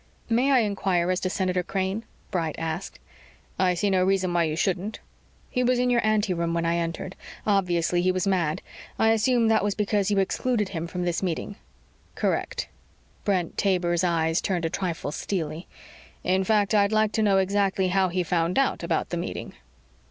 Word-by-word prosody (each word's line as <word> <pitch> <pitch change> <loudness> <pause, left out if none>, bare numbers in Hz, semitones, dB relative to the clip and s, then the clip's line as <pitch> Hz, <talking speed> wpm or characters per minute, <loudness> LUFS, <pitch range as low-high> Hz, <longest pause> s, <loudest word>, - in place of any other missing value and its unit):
"May 250 +5 +3
I 265 - +6
inquire 190 -4 0
as 185 - 0
to 185 - -1
Senator 185 -1 0
Crane?" 190 +4 -2 0.3
Bright 165 -4 -1
asked. 160 -1 -4 0.6
"I 185 -1 +3
see 200 +4 +1
no 185 -1 +3
reason 190 -1 +1
why 170 -1 +3
you 155 -1 -2
shouldn't." 190 +4 -1 0.5
"He 250 - 0
was 250 0 +3
in 250 0 +2
your 240 -1 +2
anteroom 190 -6 +1
when 170 0 0
I 170 0 +1
entered. 170 +3 -3 0.3
Obviously 180 -4 +2
he 185 +1 +3
was 185 0 -1
mad. 175 -6 0 0.3
I 225 - +3
assume 230 +1 +3
that 220 -2 +3
was 205 -1 0
because 205 -1 +1
you 205 - +1
excluded 210 +2 0
him 165 -2 -4
from 180 +1 -3
this 175 -1 -1
meeting." 185 +2 -3 0.6
"Correct." - - -1 0.6
Brent 185 -5 0
Taber's 175 -3 +1
eyes 165 -2 +1
turned 180 -4 -1
a 165 - -1
trifle 170 -6 -3
steely. 160 -1 -3 0.6
"In 185 +1 +2
fact, 210 0 +2
I'd 200 -1 +4
like 215 -1 +2
to 220 - 0
know 200 -2 +4
exactly 190 -1 +1
how 190 0 +2
he 180 +1 0
found 170 +1 0
out 275 - +2
about - - -1
the - - -1
meeting." - - -5
185 Hz, 180 wpm, -26 LUFS, 175-205 Hz, 0.6 s, I